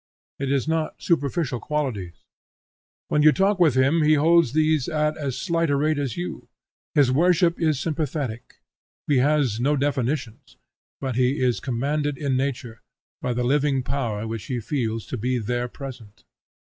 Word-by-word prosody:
It 135 -1 -1
is 140 0 0
not 160 -1 -1
superficial 145 -4 0
qualities. 120 - -3 0.9
When 150 - +2
you 155 0 +7
talk 195 +3 +1
with 160 -7 +4
him 135 +5 +3
he 155 0 +4
holds 160 -3 +4
these 155 -3 +2
at 150 -1 0
as 135 -4 -4
slight 165 +4 0
a 140 - +2
rate 150 +1 +1
as 135 -6 -3
you. 90 0 -5 0.5
His 140 -4 +4
worship 170 +4 +3
is 155 -4 +2
sympathetic; 140 -7 -4 0.4
he 145 - +2
has 135 -4 +2
no 145 +4 +2
definitions, 130 -3 -2 0.4
but 130 -3 -3
he 130 +3 +2
is 125 -2 +1
commanded 140 +3 -1
in 140 -2 -1
nature, 125 -4 -3 0.4
by 125 - -1
the 125 +1 -1
living 135 0 +1
power 120 -6 -2
which 110 -1 -5
he 125 -2 -3
feels 115 -2 -2
to 130 - -5
be 125 +3 -1
there 120 +2 -2
present. 120 -5 -10
140 Hz, 160 wpm, -24 LUFS, 125-150 Hz, 0.9 s, you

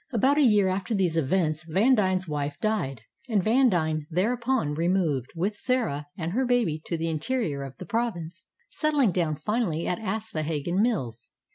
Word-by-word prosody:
About 270 +5 +3
a - - +5
year 210 -7 +5
after 190 +4 -1
these 180 -4 +1
events 155 0 +1
Vandine's 190 +1 +2
wife 145 -1 -3
died, 140 - -1 0.3
and 205 -5 +2
Vandine 175 - +2
thereupon 230 - 0
removed, 160 -5 0
with 195 +6 -1
Sarah 215 - -1
and 165 -2 -3
her 250 +7 +1
baby, 240 -11 +1
to 170 - -1
the 165 +1 -2
interior 160 - -1
of 135 -2 -8
the - - -8
province, 205 -6 -3 0.2
settling 295 - +2
down 165 -3 0
finally 170 0 -1
at 180 - -1
Aspohegan 180 -5 -2
Mills. 125 - -1
185 Hz, 155 wpm, -26 LUFS, 155-225 Hz, 0.3 s, a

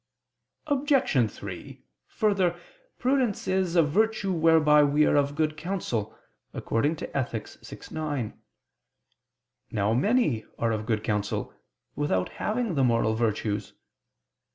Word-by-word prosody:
Obj. 275 - +2
3: 95 -3 -9 0.2
Further, 190 -5 +1 0.4
prudence 255 -5 0
is 185 -2 0
"a 170 - +6
virtue 205 +5 +1
whereby 160 -3 +5
we 145 +1 +3
are - - +3
of 145 0 +2
good 155 0 0
counsel" 155 - -3 0.4
(Ethic. 125 -3 -2
vi, - - -12 0.2
9). 145 -8 -3 1.4
Now 105 0 0
many 145 - +2
are 115 -1 0
of 110 0 -3
good 110 -2 0
counsel 105 -1 -2 0.4
without 95 -12 0
having 225 -2 -2
the 140 -4 +2
moral 115 -3 +2
virtues. 110 -2 -1
150 Hz, 110 wpm, -27 LUFS, 115-190 Hz, 1.4 s, a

